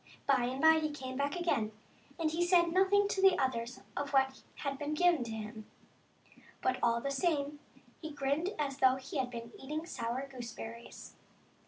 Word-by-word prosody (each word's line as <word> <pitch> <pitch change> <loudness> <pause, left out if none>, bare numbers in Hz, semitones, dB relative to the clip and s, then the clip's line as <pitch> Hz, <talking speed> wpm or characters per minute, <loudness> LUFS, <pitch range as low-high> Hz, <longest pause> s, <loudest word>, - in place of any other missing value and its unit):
By 265 -3 +3
and 255 +2 -3
by 320 +2 +6
he 310 -1 -1
came 260 -3 -6
back 280 +1 -1
again, 280 -12 0 0.4
but 320 -3 0
he 335 +2 +1
said 345 -1 +4
nothing 395 +2 +4
to 385 - -1
the 380 -2 +6
others 245 -2 -1
of 285 0 -3
what 265 -1 +2
had 275 -1 -4
been 295 +1 -2
given 345 -4 +4
to - - -6
him; 220 0 -7 0.9
but 255 0 0
all 235 0 +3
the 275 - -2
same 290 -1 0 0.4
he 315 - -5
grinned 285 +4 -1
as 285 -2 -2
though 260 -1 +5
he 265 +3 -6
had 260 -2 0
been 235 -1 -7
eating 305 +4 -4
sour 250 -3 -3
gooseberries. 235 -2 -9
275 Hz, 180 wpm, -33 LUFS, 255-315 Hz, 0.9 s, by